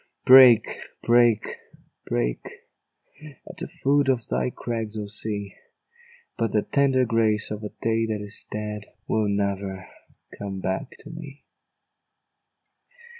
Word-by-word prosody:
Break, 125 -4 +7 0.2
break, 120 -2 +4 0.6
break - - -1 1.1
At - - -11
the - - -5
foot 140 0 +1
of 130 -2 +3
thy - - 0
crags, 115 -3 -5
O 105 - -3
Sea! 100 -1 -4 0.9
But 115 -1 0
the 105 - +2
tender 135 -2 +2
grace 110 -3 +1
of 105 0 -5
a 105 - -4
day 115 +1 -1
that 110 -1 -2
is 105 +1 -4
dead 105 0 -5 0.2
Will 110 -1 +1
never 100 -2 -2 0.5
come 100 -1 -5
back 95 +8 -4
to 155 - -11
me. 150 -4 -10
110 Hz, 125 wpm, -24 LUFS, 100-120 Hz, 1.1 s, Break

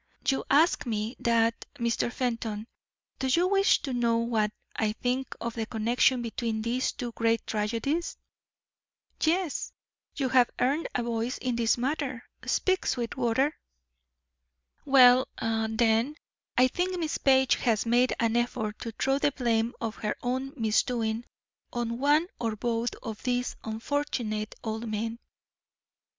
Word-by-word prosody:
"You 270 - +2
ask 305 0 +4
ME 220 +1 -2
that, 230 -1 +1
Mr. 235 -2 0
Fenton. 230 -4 -2 0.5
Do 265 - 0
you 340 +7 +3
wish 395 +1 +3
to 270 - -3
know 235 -1 +2
what 225 -2 +1 0.2
I 215 -1 0
think 250 +3 -2
of 235 -1 -3
the 225 -1 -3
connection 240 +2 +2
between 225 -1 -2
these 245 +3 0
two 245 -3 -5
great 230 0 0
tragedies?" 230 +10 -1 1.0
"Yes; 335 0 0 0.4
you 270 -3 0
have 250 -2 +5
earned 280 +6 +1
a 245 - +1
voice 235 +1 -2
in 250 -2 -2
this 230 0 +2
matter; 260 -1 -2 0.2
speak, 375 0 +1
Sweetwater." 245 +3 0 1.3
"Well, 255 -2 +7
then, 225 +3 +1 0.4
I 255 +1 +6
think 360 +7 -1
Miss 320 -3 -2
Page 265 -1 +4
has 225 -3 +1
made 245 +2 +3
an 230 -1 +1
effort 240 -3 -1
to 230 - -5
throw 270 +5 +1
the 290 - +2
blame 235 -3 0
of 225 -2 -4
her 210 -1 -2
own 260 +2 -1
misdoing 225 0 0 0.5
on 235 0 -2
one 295 +4 +4
or 225 -2 -1
both 235 +1 -1
of 220 -3 -6
these 250 0 -1
unfortunate 220 -2 -2
old 225 +1 -3
men. 225 +2 -3
240 Hz, 135 wpm, -28 LUFS, 225-265 Hz, 1.3 s, Well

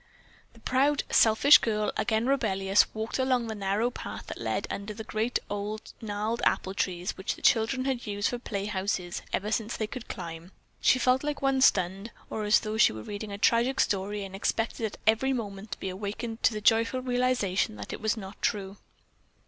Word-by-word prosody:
The 230 - -18
proud, 270 +5 +2
selfish 230 +6 +7
girl, 215 -2 0
again 220 0 +1
rebellious, 200 -7 +2
walked 220 +4 -3
along 255 -2 +2
the 225 - -4
narrow 205 +3 0
path - - -7
that - - -7
led - - -1
under 205 +1 -5
the 220 - -6
great, 220 +3 -1
old, 205 +1 -5
gnarled 215 +2 -2
apple 190 - +1
trees 180 -2 -2
which 190 +4 -3
the - - -15
children 250 +3 +3
had 260 -4 -2
used 205 0 0
for 245 - -4
playhouses 195 -4 -3
ever 210 +2 -1
since 225 +1 -1
they 220 - -1
could 240 +2 -8
climb. 165 +2 -7 0.3
She - - +5
felt 255 +2 +2
like 295 -1 -3
one 270 -1 +2
stunned, 195 -1 +3 0.2
or 215 - -2
as 210 +1 +5
though 215 0 -3
she - - +6
were 110 0 -7
reading 205 0 -6
a 200 - -5
tragic 235 +5 +2
story 200 +1 0
and 195 0 -8
expected 225 +3 -1
at 205 - -10
every 225 +5 +3
moment 205 -3 -5
to - - -9
be 190 - -3
awakened 215 +4 -5
to - - +4
the 210 - -4
joyful 230 +4 +3
realization 245 - +1
that 100 -1 -7
it - - -7
was 220 +1 0
not 195 -2 -9
true. 200 -1 -1
215 Hz, 195 wpm, -28 LUFS, 200-240 Hz, 0.3 s, selfish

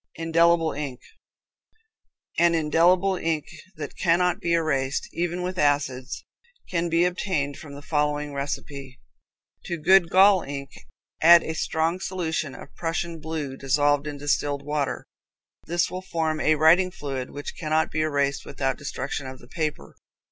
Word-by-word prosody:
Indelible 165 0 +3
Ink. 140 -4 -5 1.4
An 170 0 +4
indelible 175 +5 +3
ink 160 -3 -1 0.3
that 150 -3 -7
cannot 180 0 +2
be 170 - 0
erased, 140 -5 0
even 175 +1 -2
with 180 +1 -3
acids, 140 -3 0 0.5
can 170 -1 0
be 170 +1 +3
obtained 175 -6 -1
from 145 -3 -10
the 145 - -10
following 150 -1 -1
recipe: 140 -1 -5 0.7
To 170 - -3
good 175 +2 +5
gall 190 0 +6
ink 140 -2 -6 0.5
add 170 +1 +8
a 160 - -3
strong 160 +2 -1
solution 160 -6 -3
of - - -12
Prussian 165 0 -3
blue 155 -3 -4
dissolved 145 +2 +1
in 145 -1 -5
distilled 145 0 -1
water. 150 -2 -2 0.6
This 175 +1 0
will 185 - -4
form 160 -4 -2
a 155 0 +3
writing 165 +5 +5
fluid 135 -6 -5
which 145 0 -7
cannot 155 0 0
be 155 - -1
erased 140 -3 0
without 135 -2 -2
destruction 145 -1 -4
of 130 0 -8
the 120 - -16
paper. 155 -2 -4
155 Hz, 145 wpm, -25 LUFS, 145-170 Hz, 1.4 s, add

